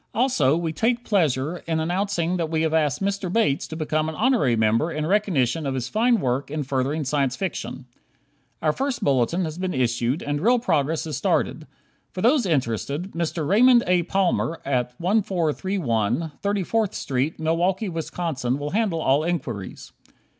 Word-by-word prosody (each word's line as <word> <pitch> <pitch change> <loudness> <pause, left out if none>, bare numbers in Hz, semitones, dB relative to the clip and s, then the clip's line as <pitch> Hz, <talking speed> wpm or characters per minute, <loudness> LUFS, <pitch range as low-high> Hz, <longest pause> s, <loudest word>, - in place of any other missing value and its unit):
Also, 170 - +2
we 165 -2 -2
take 235 +5 0
pleasure 160 - +1
in 160 -1 0
announcing 175 +1 -1
that 165 -2 -2
we 160 0 0
have 160 -1 0
asked 155 +1 +1
Mr. 195 -2 -1
Bates 210 -10 +1
to 160 - -7
become 155 0 -1
an 160 - -6
honorary 225 - +2
member 115 +8 +2
in 155 -1 -2
recognition 165 - +1
of 135 - -2
his 125 -2 -2
fine 235 +1 +2
work 130 -1 -1
in 150 0 -2
furthering 135 +3 -1
Science 135 -2 0
Fiction. 165 -7 -4 0.8
Our 155 -1 +3
first 270 - -2
bulletin 140 +7 +1
has 160 +2 -6
been 185 0 -2
issued 120 +3 0
and 145 0 -2
real 240 +6 +4
progress 160 - 0
is 155 -5 -4
started. - - 0 0.5
For 185 - -4
those 245 -2 +3
interested, 140 - -1
Mr. 165 -2 -2
Raymond 240 - +5
A. 180 0 +3
Palmer 175 -2 0
at 125 -2 -1
1431 170 - 0
34th 205 +1 0
St., 135 +4 -1
Milwaukee, 175 +6 0
Wisconsin, 160 -6 -2
will 145 +1 -4
handle 195 -6 0
all 140 +2 +2
inquiries. 130 - -4
160 Hz, 160 wpm, -24 LUFS, 140-190 Hz, 0.8 s, Raymond